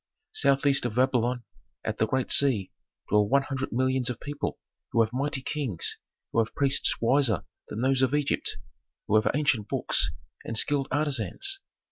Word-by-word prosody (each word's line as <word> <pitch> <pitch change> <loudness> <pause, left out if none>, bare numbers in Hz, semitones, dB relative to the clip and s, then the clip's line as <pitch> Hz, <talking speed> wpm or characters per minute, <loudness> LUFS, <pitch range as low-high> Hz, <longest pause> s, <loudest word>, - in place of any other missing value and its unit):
"Southeast 140 0 +2
of 110 - -7
Babylon, 125 -1 +1 0.4
at - - -3
the 110 - +2
great 130 +1 -1
sea, 125 -9 +3 0.4
dwell 105 0 +3
one 140 +1 +3
hundred 135 -1 -4
millions 130 +1 +1
of 125 - -4
people 145 0 -4 0.3
who 115 - +2
have 110 +1 -5
mighty 135 0 -2
kings, 130 - -1 0.3
who - - +1
have 115 0 -1
priests 140 -1 +3
wiser 120 - +2 0.2
than 110 - -5
those 135 0 +2
of 130 +2 +2
Egypt, 145 -1 -1 0.5
who - - -3
have 110 - +4
ancient 130 -8 +1
books, - - +1 0.3
and 115 - -1
skilled 140 +2 +2
artisans. 150 - 0
130 Hz, 160 wpm, -27 LUFS, 115-140 Hz, 0.5 s, have